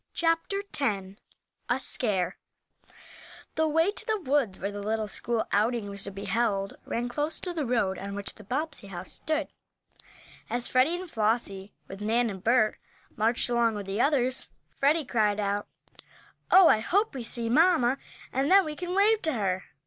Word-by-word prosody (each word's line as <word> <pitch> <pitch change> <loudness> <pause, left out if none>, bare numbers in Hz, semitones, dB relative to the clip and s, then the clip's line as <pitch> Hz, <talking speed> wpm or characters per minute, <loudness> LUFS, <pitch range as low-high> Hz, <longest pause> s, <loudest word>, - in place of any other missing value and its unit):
CHAPTER 330 +4 0 0.2
X 195 -7 -1 0.5
A - - +2
SCARE 195 -8 -1 1.2
THE 315 0 +1
way 325 +5 +3
to 420 - -9
the 435 -1 +1
woods 270 - 0
where 200 +2 -3
the 205 0 -6
little 215 +1 -1
school 230 +2 -1
outing 215 0 +1
was 200 -1 -3
to 200 - -5
be 200 +1 -7
held 200 -1 0
ran 240 +1 -2
close 295 +5 -2
to 360 - -2
the 310 -6 -2
road 215 -6 0
on 200 0 -5
which 200 -1 -3
the 215 - -14
Bobbsey 285 +1 -2
house 190 -1 -7
stood. 310 -1 -1 1.0
As 240 0 +1
Freddie 260 +7 +3
and 370 - -7
Flossie, 210 - -1 0.2
with 195 +1 -9
Nan 230 +2 +1
and 190 -1 -9
Bert, 225 -2 +3 0.4
marched 225 +2 +1
along 235 -2 +2
with 205 -1 -5
the 195 +4 -1
others, 260 -3 +1 0.3
Freddie 295 +2 +2
cried 215 -4 +1
out: 205 0 -1 0.8
"Oh, 375 -2 +8
I 220 - +5
hope 400 - +1
we 260 -3 -5
see 230 0 -1
mamma, 275 -1 +4 0.3
and 270 +3 +1
then 390 -1 +6
we 305 -1 -4
can 355 +3 -4
wave 425 +2 +4
to 315 - 0
her." 190 -5 -1
235 Hz, 175 wpm, -28 LUFS, 205-305 Hz, 1.2 s, Oh